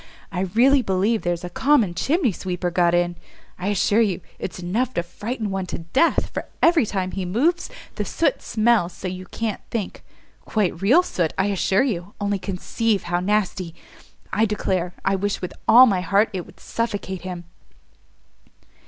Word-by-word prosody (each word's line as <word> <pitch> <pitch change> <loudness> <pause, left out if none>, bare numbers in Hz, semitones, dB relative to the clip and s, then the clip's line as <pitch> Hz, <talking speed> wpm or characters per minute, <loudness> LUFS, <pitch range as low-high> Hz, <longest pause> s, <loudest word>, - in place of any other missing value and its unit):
I 190 0 -1
really 270 +4 +5
believe 205 +2 +1
there's 175 -1 -2
a 180 - -4
common 255 -10 +3
chimney 270 - +1
sweeper 180 -1 -3
got 175 -1 +3
in! 175 0 0 0.4
I 180 - -3
assure 205 +2 +2
you 195 -5 0 0.2
it's 175 - -5
enough 220 +9 -1
to 170 - 0
frighten 210 +4 -4
one 190 -1 -2
to - - -4
death, 215 - +1
for - - -4
every 330 -9 +4
time 190 -2 -2
he 195 - -3
moves 280 - +1 0.3
the - - 0
soot 305 -5 0
smells 215 -5 +2
so 190 - -6
you 185 0 -6
can't 225 +1 -3
think; 215 -5 -4 0.4
quite 195 -5 -1
real 260 - +5
soot, 170 - -1
I 195 - +2
assure 195 +2 +2
you! 200 -7 -3
only 205 -1 -1
conceive 200 +2 -1
how 175 0 -1
nasty! 185 -3 -1 0.6
I 225 - +3
declare 185 -4 -1
I 195 0 +3
wish 200 +1 -1
with 180 - -5
all 240 +4 +9
my 195 -7 +1
heart 200 +5 +2
it 180 -2 -4
would - - -17
suffocate 205 -5 -3
him!" 180 -1 -6
195 Hz, 170 wpm, -23 LUFS, 180-225 Hz, 0.6 s, all